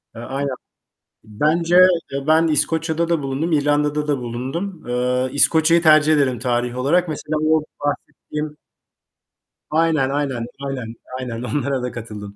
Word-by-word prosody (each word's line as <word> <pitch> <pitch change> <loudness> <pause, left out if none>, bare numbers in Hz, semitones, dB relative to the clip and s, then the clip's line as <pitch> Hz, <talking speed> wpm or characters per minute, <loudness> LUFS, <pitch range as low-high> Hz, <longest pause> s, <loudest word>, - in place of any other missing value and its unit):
Eee, 115 - -8
aynen. 135 +2 -3 0.7
Bence 155 +11 +1 0.4
eee, 140 +1 -4
ben 160 +1 +4
İskoçya'da 160 +2 0
da 170 -3 0
bulundum, 140 +5 -2
İrlanda'da 150 0 +1
da 145 -2 +1
bulundum. 130 +8 -5
Eee, 125 +1 0
İskoçya'yı 160 +3 +4
tercih 155 -1 +5
ederim 135 -4 +1
tarih 120 +1 -1
olarak. 170 +7 +2
Mesela 155 0 -3
o 160 -1 +3 0.2
bahsettiğim 150 +1 -4 1.1
Aynen, 155 -4 +2
aynen, 135 -5 -2 0.2
aynen, 125 -4 -5 0.2
aynen 120 -3 -5
onlara 135 0 -1
da 125 - -3
katıldım. 105 -3 -8
145 Hz, 130 wpm, -20 LUFS, 125-155 Hz, 1.1 s, tercih